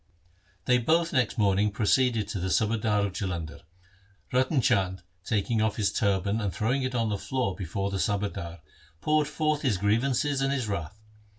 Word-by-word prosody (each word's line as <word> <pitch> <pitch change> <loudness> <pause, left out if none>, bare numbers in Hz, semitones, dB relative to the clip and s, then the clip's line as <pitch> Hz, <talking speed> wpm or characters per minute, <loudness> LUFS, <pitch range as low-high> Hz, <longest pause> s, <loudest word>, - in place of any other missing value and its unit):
They 125 0 +4
both 165 +7 +1
next 125 -5 +1
morning 100 -1 +3
proceeded 110 +1 +1
to 100 - -3
the 95 +2 -2
subadar 105 -1 +1
of 100 - -4
Jalandhar. 85 -6 -4 0.7
Ratan 130 +2 +2
Chand, 95 -6 +1 0.2
taking 110 +2 0
off 110 -1 +1
his 105 -3 0
turban 100 +2 +1
and 100 -3 -1
throwing 125 +8 0
it 130 -1 -2
on 115 -2 +1
the 100 -2 -2
floor 130 -8 -2
before 100 +1 -3
the 95 - -2
subadar, 100 -6 -2 0.4
poured 150 - +2
forth 155 0 0
his 125 -8 +1
grievances 125 +7 +1
and 135 0 +1
his 130 -5 -1
wrath. 100 -1 -4
105 Hz, 170 wpm, -27 LUFS, 100-130 Hz, 0.7 s, They